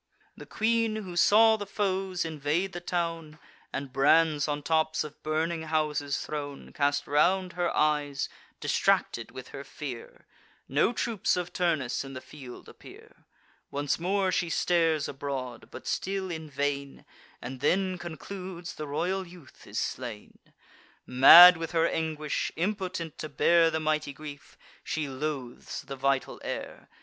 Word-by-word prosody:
The - - -12
queen, 225 0 +1
who 190 -5 -6
saw 220 +5 +6
the 205 -1 -6
foes 190 -3 -1
invade 160 +4 -1
the 175 - -4
town, 165 -3 -3 0.3
And 135 -2 -5
brands 150 +2 +4
on 145 -1 -2
tops 155 0 +1
of 150 -1 -11
burning 160 +2 -1
houses 155 -2 -1
thrown, 145 -2 -6
Cast 145 0 +1
round 180 +5 +2
her 175 -1 0
eyes, 150 -2 +1 0.3
distracted - - +1
with - - -10
her - - -8
fear— - - -8 0.4
No - - +2
troops 230 -6 0
of 180 0 -4
Turnus 155 -10 0
in 135 0 -9
the 130 - -6
field 130 -2 -12
appear. - - -15 0.4
Once 145 +2 -1
more 190 +2 +1
she 175 -1 0
stares 165 -3 +2
abroad, 130 -3 -5
but - - -10
still 190 -1 -2
in 160 -2 -6
vain, 140 0 -3 0.3
And 130 +1 -7
then 185 +5 +1
concludes 175 +1 -7
the 150 - -6
royal 185 +6 -2
youth 170 -6 -16
is - - -7
slain. 120 -5 -5 0.7
Mad 170 +8 +10
with 165 +1 -5
her 165 0 +3
anguish, 155 -2 -2
impotent 180 -3 -3
to 155 - -5
bear 170 +1 +4
The 160 0 -1
mighty 155 -2 -1
grief, 145 -1 -11 0.3
she 155 -2 -2
loathes 135 -2 -5
the 135 - -7
vital 135 0 -1
air. - - -6
160 Hz, 145 wpm, -28 LUFS, 145-180 Hz, 0.7 s, Mad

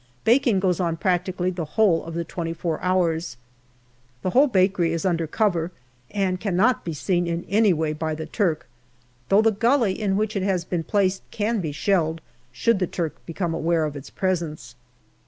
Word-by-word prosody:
Baking 235 -3 +4
goes 185 -3 +1
on 170 -2 0
practically 180 0 0
the 175 -2 -4
whole 195 -7 +4
of 165 0 -7
the 170 - -1
twenty 165 0 -4
four 165 -2 -3
hours. 170 -6 0 0.9
The 185 - 0
whole 275 +7 +5
bakery 185 - +2
is 165 +1 -2
under 170 -3 +1
cover, 175 -2 0 0.4
and 190 -3 -1
cannot 205 +5 +2
be 170 - -4
seen 175 +3 0
in 170 +1 -3
any 210 0 +4
way 160 -2 0
by 155 0 -3
the 160 0 -5
Turk, 170 -7 -1 0.6
though 205 +3 +5
the 225 - +4
gully 230 0 +2
in 195 -2 +1
which 215 +1 -1
it 195 - 0
has 185 -3 0
been 175 -3 -2
placed 195 0 +1
can 215 0 -1
be 155 -4 -3
shelled, 165 0 0 0.3
should 195 - +1
the 180 - 0
Turk 165 -3 -4
become 165 0 -2
aware 165 0 +1
of 150 -1 -4
its 140 -1 -8
presence. 160 -10 -3
180 Hz, 185 wpm, -24 LUFS, 165-200 Hz, 0.9 s, whole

